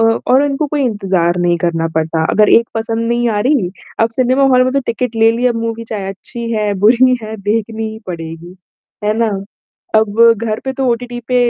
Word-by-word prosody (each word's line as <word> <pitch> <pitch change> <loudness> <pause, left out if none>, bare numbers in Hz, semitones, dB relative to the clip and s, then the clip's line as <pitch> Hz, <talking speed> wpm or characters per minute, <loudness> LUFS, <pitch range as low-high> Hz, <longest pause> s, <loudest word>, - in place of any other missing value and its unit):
अ, - - -3
और 265 +2 +5
इनको 285 +2 -1
कोई 290 0 -1
इंतज़ार 190 -6 0
नहीं 175 -1 +2
करना 165 -1 0
पड़ता। 160 0 0
अगर 210 0 +4
एक 230 0 +4
पसंद 225 +1 -2
नहीं 240 0 +1
आ 210 -2 0
रही, 245 -6 +1 0.3
आप 225 - +3
सिनेमा 255 +2 +3
हॉल 255 0 +5
में 255 - 0
तो 275 - +2
टिकट 235 0 -2
ले 225 0 +4
लिया 245 +2 +1
मूवी 230 0 -4
चाहे 200 -3 -4
अच्छी 230 +4 -6
है, 210 -2 0
बुरी 250 +2 +5
है 220 0 -6
देखनी 220 +2 -2
ही 220 - -9
पड़ेगी। 165 0 -7 0.5
है 210 +1 +1
ना? 230 -1 +2 0.7
अब 220 0 +1 0.2
घर 215 -1 -2
पे 265 - -1
तो 265 0 -2
ओटीटी 240 +1 -4
पे 250 - 0
225 Hz, 205 wpm, -15 LUFS, 200-245 Hz, 0.7 s, और